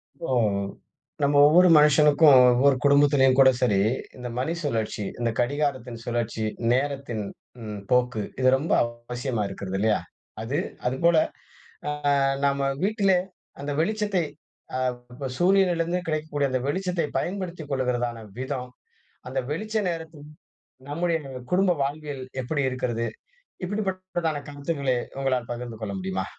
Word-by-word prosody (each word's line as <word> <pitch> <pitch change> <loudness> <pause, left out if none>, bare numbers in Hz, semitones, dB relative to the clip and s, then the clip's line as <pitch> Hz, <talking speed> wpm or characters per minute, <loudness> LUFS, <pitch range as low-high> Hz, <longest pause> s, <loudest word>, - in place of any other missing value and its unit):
இப்போ, 165 - -6 0.9
நம்ம 140 +1 +3
ஒவ்வொரு 175 +4 +6
மனுசனுக்கும், 150 -1 +6 0.2
ஒவ்வொரு 135 +3 +4
குடும்பத்திலும் 140 -2 +5
கூட 135 -1 +8
சரி. 105 -6 +3 0.4
இந்த 125 -1 -6
மணி 160 +6 -1
சுழற்சி, 110 -6 -2
இந்த 120 -1 +1
கடிகாரத்தின் 130 -2 -1
சுழற்சி, 115 -2 -2 0.3
நேரத்தின் 135 -4 -1 0.4
ம். 105 -1 -5
போக்கு, 125 -3 +2 0.2
இது 130 0 +5
ரொம்ப 150 +5 -4
அவசியமா 120 0 -4
இருக்கிறது 95 0 -5
இல்லையா? 110 +1 +2 0.4
அது, 120 +6 -2 0.3
அதுபோல 165 +7 +3 0.7
அ - - 0 0.5
நம்ம 140 0 +1 0.2
வீட்டிலே 200 -2 +3 0.4
அந்த 140 +1 -4
வெளிச்சத்தை 205 +1 +1 0.6
அ - - -1 0.6
சூரியனில 180 -1 +3
இருந்து 175 +2 -1
கிடைக்கக்கூடிய 155 -3 -1
அந்த 130 - +1
வெளிச்சத்தை 180 +1 -1
பயன்படுத்திக் 175 -5 -4
கொள்கிறதான 125 -3 -1 0.2
விதம். 130 -1 -4 0.6
அந்த 130 - -1
வெளிச்ச 215 +8 -4
நேரத்துல 160 -3 -6 0.7
நம்முடைய 165 +3 0 0.3
குடும்ப 185 +1 +3
வாழ்வியல் 145 -1 -4 0.2
எப்படி 140 +2 -1
இருக்கிறது? 120 -2 -2 0.6
இப்படிப்பட்டதான 185 -5 -2
கருத்துக்களை 140 -3 -1 0.2
உங்களால் 130 -3 -1
பகிர்ந்து 120 -2 -6
கொள்ள 100 -2 -4
முடியுமா? 95 0 -3
140 Hz, 120 wpm, -25 LUFS, 125-165 Hz, 0.9 s, கூட